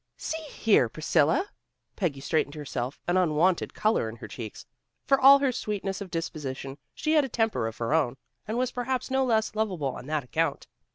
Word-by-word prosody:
"See 320 0 -4
here, 200 - +3
Priscilla!" 160 - +1 0.4
Peggy 155 -9 -2
straightened 155 0 0
herself, 135 -3 -4
an 175 +1 +2
unwonted 175 +1 +2
color 215 - +1
in 110 - -8
her 120 - -9
cheeks. 110 -4 -8 0.4
For 275 0 +3
all 275 +1 +10
her 275 -2 +1
sweetness 205 -5 -3
of 195 - -6
disposition, 145 -5 -5 0.2
she 310 - 0
had 305 -2 +5
a 270 - -3
temper 225 - 0
of 110 - -7
her 115 +5 -1
own, 135 -6 +1 0.3
and 220 +2 -2
was 255 0 0
perhaps 255 +1 -2
no 265 0 +3
less 220 -4 +1
lovable 185 -11 -1
on - - -9
that 155 -2 -1
account. 125 - -1
180 Hz, 185 wpm, -27 LUFS, 140-235 Hz, 0.4 s, all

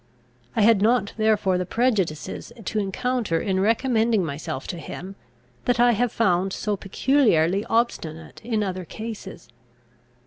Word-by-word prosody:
I - - +2
had 220 -2 +5
not 220 -1 +2
therefore 210 -4 +2
the 180 - -1
prejudices 210 - -1
to 215 - -1
encounter 210 -2 -1
in 190 +1 0
recommending 225 -1 +2
myself 145 -1 -5
to 175 - -4
him, 185 +4 -8 0.5
that 245 -1 +1
I 240 0 +6
have 240 +1 +1
found 190 -3 +1
so 210 -1 -1
peculiarly 195 - +2
obstinate 170 -9 -2
in 220 -2 0
other 185 -2 -3
cases. 210 - -8
205 Hz, 135 wpm, -24 LUFS, 180-230 Hz, 0.5 s, I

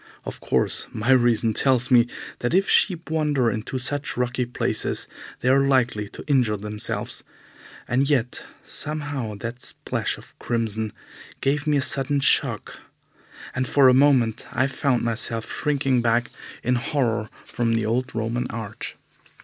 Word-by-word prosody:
Of - - -6
course, - - 0
my 110 +4 0
reason 120 -3 +3
tells 125 0 +2
me 120 -1 +6 0.3
that 120 +7 0
if 195 +1 +3
sheep 175 -5 +2
wander 145 -7 +1
into 110 +5 -4
such 145 +2 -2
rocky 125 0 -1
places 120 - -1 0.3
they 125 - +1
are 135 +1 +5
likely 120 -6 +1
to - - -10
injure 125 -7 +2
themselves, 105 +1 -2 0.6
and 135 +3 +1
yet 130 -4 0 0.2
somehow 145 -7 -3
that 120 +3 -5
splash - - -2
of - - -16
crimson 110 -2 0 0.5
gave 145 +3 0
me 150 -1 +3
a 140 - +2
sudden 140 +1 +2
shock, 140 - +2 0.7
and 130 0 -1
for 135 +1 +5
a - - +5
moment 130 -5 +3
I 130 - +1
found 135 -2 0
myself 115 -1 -1
shrinking 140 -4 +1
back 115 0 +1 0.3
in 125 +1 +2
horror 120 -4 -1 0.2
from 115 -1 -1
the 115 -1 0
old 125 +3 -1
Roman 115 +2 -1
arch. 110 -2 -6
125 Hz, 150 wpm, -23 LUFS, 115-140 Hz, 0.7 s, me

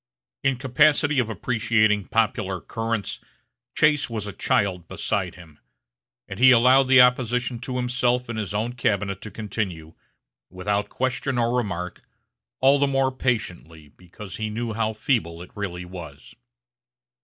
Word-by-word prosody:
In 135 -2 +1
capacity 145 +3 +3
of 120 -3 0
appreciating 110 -1 +1
popular 95 -4 0
currents 115 +1 -3 0.6
Chase 150 -4 +3
was 110 -3 -4
as 100 - -6
a - - -26
child 90 -4 0
beside - - -2
him; 80 -4 -15 0.7
and - - -7
he 130 +1 +8
allowed 130 +2 +6
the 130 0 +6
opposition 125 -1 +3
to 125 +1 -5
himself 125 0 0
in 115 - -5
his 105 -3 -4
own 110 +4 -2
cabinet 100 -5 -1
to 110 - -7
continue, 95 -7 -5 0.6
without 100 +3 -2
question 130 0 -2
or 120 0 +1
remark, 90 -7 -3 0.6
all 135 +2 +5
the 140 - +3
more 135 -1 +1
patiently, 90 - -3
because 90 +4 -11
he 110 -1 -3
knew 115 +1 -3
how 110 0 -1
feeble 105 -8 -1
it 90 - -11
really 90 -3 -5
was. 85 -6 -10
115 Hz, 145 wpm, -24 LUFS, 95-125 Hz, 0.7 s, he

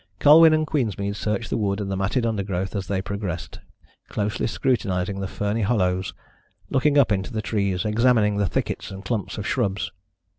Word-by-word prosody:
Colwyn 160 - +8
and 155 0 +2
Queensmead 100 - -1
searched 105 +2 -2
the - - +1
wood 100 -1 0
and 100 -2 -3
the - - -1
matted 100 +6 0
undergrowth 100 -3 -2
as 95 -3 -3
they 95 -1 -1
progressed, 100 -5 -5 0.5
closely 105 0 -1
scrutinising 100 -6 -1
the 95 - -3
ferny 105 +4 -2
hollows, 95 -4 0 0.6
looking 145 +2 +3
up 135 -6 +5
into 100 +3 -1
the 110 - -3
trees, 100 -4 -1
examining 110 -1 +3
the 100 -2 +1
thickets - - -3
and 95 +1 -9
clumps 110 -5 -3
of 105 - -4
shrubs. 105 -6 -1
105 Hz, 175 wpm, -24 LUFS, 95-115 Hz, 0.6 s, Colwyn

